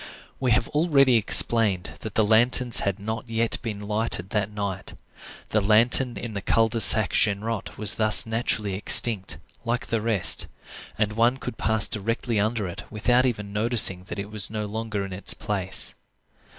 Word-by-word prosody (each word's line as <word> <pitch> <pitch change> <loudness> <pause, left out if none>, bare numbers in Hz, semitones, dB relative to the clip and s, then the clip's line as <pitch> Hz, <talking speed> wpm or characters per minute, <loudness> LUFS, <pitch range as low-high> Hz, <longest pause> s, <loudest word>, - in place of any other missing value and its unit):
We 130 - -1
have 115 - 0
already 145 -5 +3
explained 110 -3 +2
that 110 -2 -8
the 110 - +2
lanterns 120 +2 +2
had 100 0 -2
not 110 +5 -6 0.3
been 110 -4 -6
lighted 105 -3 -2
that 105 -2 -1
night. 100 -2 -6 0.5
The 105 - +1
lantern 120 +4 +3
in 115 -2 -7
the 100 - -5
Cul 115 +3 +2
de 115 +1 -2
Sac 110 0 +5
Genrot 105 +1 -1
was 105 -1 +2
thus 110 -1 +4
naturally 110 -3 -2
extinct, 100 +1 +3 0.3
like 120 +1 -2
the 115 -2 -2
rest; 110 -4 0 0.5
and 105 0 -1
one 120 +4 +1
could 125 -3 -8
pass 110 -1 +2
directly 115 +1 -2
under 110 -1 -1
it 85 - -8
without 120 +4 +1
even 105 -4 -5
noticing 105 -4 +2
that - - -8
it 100 +1 -7
was 110 -2 +1
no 110 -1 -4
longer 105 -1 -4
in 95 - -8
its 90 - -2
place. 95 -2 0
110 Hz, 165 wpm, -24 LUFS, 100-115 Hz, 0.5 s, Sac